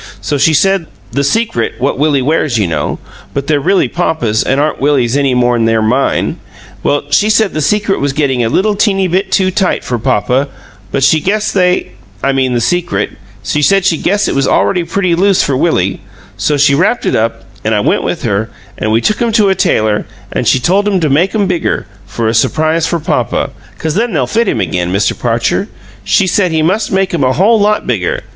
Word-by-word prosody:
So 145 Hz, -2 st, -2 dB
she 155 Hz, +3 st, +3 dB
said 195 Hz, +2 st, +2 dB, 0.3 s
the -, -, -8 dB
the 140 Hz, -, +2 dB
secret 140 Hz, -, 0 dB
what 130 Hz, +2 st, -1 dB
Willie 145 Hz, -3 st, +2 dB
wears, 145 Hz, -3 st, 0 dB
you 105 Hz, -, +1 dB
know, 80 Hz, -4 st, -2 dB, 0.4 s
but 140 Hz, 0 st, -2 dB
they're 150 Hz, -1 st, +1 dB
really 190 Hz, +7 st, +2 dB
papa's 160 Hz, -11 st, -1 dB
an' 135 Hz, -, 0 dB
aren't 150 Hz, 0 st, -1 dB
Willie's 135 Hz, -4 st, +1 dB
any 140 Hz, -3 st, +1 dB
more'n 120 Hz, -2 st, +2 dB
they're 115 Hz, 0 st, +2 dB
MINE 115 Hz, +5 st, 0 dB, 0.4 s
well, 145 Hz, -, 0 dB
she 210 Hz, +8 st, +3 dB
said 215 Hz, -1 st, +2 dB
the 155 Hz, -, -2 dB
secret 200 Hz, +5 st, 0 dB
was 140 Hz, 0 st, 0 dB
gettin' 135 Hz, -4 st, 0 dB
a 115 Hz, -, 0 dB
little 205 Hz, -, +1 dB
teeny 195 Hz, -2 st, +1 dB
bit 190 Hz, +2 st, -1 dB
too 185 Hz, 0 st, +2 dB
tight 190 Hz, 0 st, 0 dB
for 120 Hz, -1 st, -3 dB
papa, 125 Hz, +7 st, 0 dB, 0.4 s
but 135 Hz, -, -1 dB
she 155 Hz, +3 st, +4 dB
guessed 210 Hz, +5 st, -1 dB
they 180 Hz, -, +1 dB, 0.3 s
I 140 Hz, -, +2 dB
mean 130 Hz, -2 st, 0 dB
the -, -, +1 dB
secret 175 Hz, +6 st, -1 dB, 0.3 s
she 150 Hz, +9 st, -1 dB
said 195 Hz, +4 st, +3 dB
she 170 Hz, -4 st, +2 dB
guessed 205 Hz, +2 st, +1 dB
it -, -, -1 dB
was 135 Hz, 0 st, +1 dB
already 180 Hz, -3 st, +1 dB
pretty 180 Hz, +1 st, 0 dB
loose 190 Hz, +2 st, +3 dB
for 140 Hz, -, 0 dB
Willie; 115 Hz, -, 0 dB, 0.3 s
so 150 Hz, -, 0 dB
she 140 Hz, 0 st, +4 dB
wrapped 185 Hz, +11 st, +1 dB
it -, -, +1 dB
up, 115 Hz, -2 st, -1 dB, 0.2 s
an' 110 Hz, 0 st, +1 dB
I 105 Hz, -, +1 dB
went -, -, +1 dB
with -, -, -3 dB
her, 105 Hz, +3 st, -1 dB, 0.3 s
an' 110 Hz, -, -1 dB
we 110 Hz, +1 st, +2 dB
took 215 Hz, -, 0 dB
'em 235 Hz, -1 st, +1 dB
to 210 Hz, -3 st, +3 dB
a -, -, +3 dB
tailor, 110 Hz, -, 0 dB, 0.2 s
an' -, -, -2 dB
she 130 Hz, -, +3 dB
told 195 Hz, +10 st, +1 dB
him 195 Hz, -2 st, +1 dB
to 155 Hz, -3 st, +1 dB
make 175 Hz, +9 st, +1 dB
'em 205 Hz, -2 st, +2 dB
bigger, 180 Hz, -, -1 dB, 0.2 s
for 110 Hz, +3 st, -3 dB
a 110 Hz, -, +1 dB
surprise 155 Hz, +7 st, +1 dB
for 170 Hz, -, -1 dB
papa, -, -, -1 dB, 0.3 s
'cause 160 Hz, -1 st, -2 dB
then 225 Hz, +5 st, -1 dB
they'll 140 Hz, -6 st, +1 dB
fit 225 Hz, -, 0 dB
him -, -, 0 dB
again, 90 Hz, 0 st, -2 dB
Mr. 100 Hz, +2 st, +1 dB
Parcher. 120 Hz, -, -1 dB, 0.4 s
She 195 Hz, -, +2 dB
said 185 Hz, -1 st, +1 dB
he 160 Hz, -1 st, +1 dB
must 195 Hz, +7 st, 0 dB
make 190 Hz, -1 st, 0 dB
'em 160 Hz, -5 st, 0 dB
a 130 Hz, 0 st, +2 dB
whole 215 Hz, -, +3 dB
lot 210 Hz, +1 st, +1 dB
bigger. -, -, -2 dB
155 Hz, 220 wpm, -13 LUFS, 125-190 Hz, 0.4 s, she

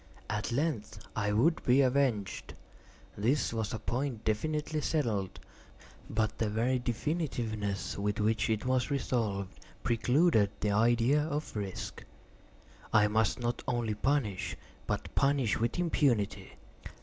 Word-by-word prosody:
At 105 Hz, +2 st, -2 dB
length 135 Hz, -4 st, -1 dB, 0.2 s
I 105 Hz, -2 st, 0 dB
would 140 Hz, +11 st, +2 dB
be 125 Hz, +3 st, +5 dB
avenged; 125 Hz, -6 st, 0 dB, 0.6 s
this 120 Hz, +5 st, +1 dB
was 110 Hz, -2 st, -2 dB
a -, -, -2 dB
point 120 Hz, -1 st, -3 dB
definitively 150 Hz, +7 st, -1 dB
settled—but 110 Hz, -, -3 dB
the 110 Hz, -, +1 dB
very 120 Hz, +4 st, +1 dB
definitiveness 120 Hz, -, -2 dB
with 105 Hz, +2 st, -1 dB
which 110 Hz, 0 st, +1 dB
it 110 Hz, 0 st, 0 dB
was 130 Hz, +1 st, +1 dB
resolved, 110 Hz, -8 st, -1 dB, 0.2 s
precluded 120 Hz, -, +3 dB
the 105 Hz, -, 0 dB
idea 120 Hz, +6 st, +3 dB
of 150 Hz, -3 st, -3 dB
risk. 100 Hz, -3 st, -5 dB, 0.9 s
I 105 Hz, -1 st, +5 dB
must 110 Hz, +1 st, +1 dB
not 120 Hz, 0 st, -2 dB
only 120 Hz, -3 st, 0 dB
punish, 110 Hz, -4 st, 0 dB, 0.3 s
but -, -, -3 dB
punish 140 Hz, -6 st, +2 dB
with 115 Hz, +6 st, 0 dB
impunity. 120 Hz, -, +1 dB
115 Hz, 120 wpm, -31 LUFS, 105-140 Hz, 0.9 s, be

